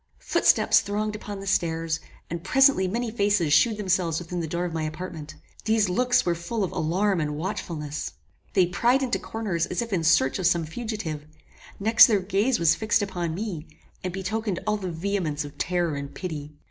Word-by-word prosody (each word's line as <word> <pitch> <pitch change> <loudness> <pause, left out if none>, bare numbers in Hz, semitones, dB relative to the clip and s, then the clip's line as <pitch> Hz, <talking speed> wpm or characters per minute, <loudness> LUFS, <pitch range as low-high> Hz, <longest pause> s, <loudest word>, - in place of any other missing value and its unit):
Footsteps - - +3
thronged 210 +1 -2
upon 205 -1 -7
the - - -8
stairs, 165 -3 0 0.3
and 170 0 -5
presently 265 -2 +4
many 230 +4 -2
faces 200 -8 +2
shewed 215 +7 +4
themselves 185 -5 0
within 175 +1 -4
the 165 - -2
door 170 +3 -2
of 175 - -4
my 160 - -2
apartment. 155 0 -6 0.3
These 220 -3 +2
looks 245 +7 +2
were 175 - +2
full 175 +6 -3
of 185 - -2
alarm 185 +3 0
and 150 -1 -2
watchfulness. 155 -4 -4 0.4
They 185 -2 +5
pryed 240 +10 +2
into 250 -2 0
corners 200 -7 -2
as - - -3
if 230 -3 -6
in 170 -3 0
search 160 -2 +3
of 180 - +2
some 170 -2 +2
fugitive; 165 -6 -5 0.5
next 220 +3 +7
their 210 -3 +2
gaze 205 +6 +1
was 165 -1 +4
fixed 215 -1 +1
upon 175 -4 -3
me, 180 -6 -5 0.4
and 185 - -2
betokened 195 +1 -2
all 210 0 +1
the 190 -3 -4
vehemence 165 -4 -2
of 145 - -12
terror 175 -3 0
and 140 0 -5
pity. 150 -5 -6
180 Hz, 185 wpm, -25 LUFS, 165-210 Hz, 0.5 s, next